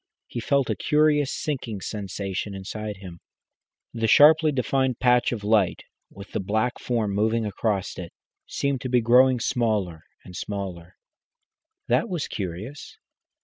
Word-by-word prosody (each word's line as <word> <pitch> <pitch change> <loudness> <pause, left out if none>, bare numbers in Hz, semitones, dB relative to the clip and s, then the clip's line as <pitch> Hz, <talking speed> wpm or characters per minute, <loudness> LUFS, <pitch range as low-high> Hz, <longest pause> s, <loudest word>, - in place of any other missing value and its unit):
He 120 - -6
felt 140 +3 +1
a - - 0
curious 150 -2 +2
sinking 125 -8 -3
sensation 100 -1 -4
inside 105 +2 -6
him. 90 -3 -10 0.7
The 115 -1 -1
sharply 155 +5 +6
defined 130 -2 0
patch 125 -1 +3
of 110 -4 -4
light, 105 -3 +2 0.3
with 100 -1 -12
the - - -2
black 110 +5 -1
form 115 -4 -1
moving 110 +2 +1
across 105 -2 -2
it, 85 -2 -7 0.4
seemed 140 -2 -1
to 130 - -4
be 125 0 +4
growing 125 +2 +5
smaller 105 -9 -1 0.2
and 90 - -12
smaller. 95 -2 -6 0.9
That 235 - +1
was 175 -5 -2
curious. 100 +9 -6
110 Hz, 140 wpm, -25 LUFS, 100-130 Hz, 0.9 s, sharply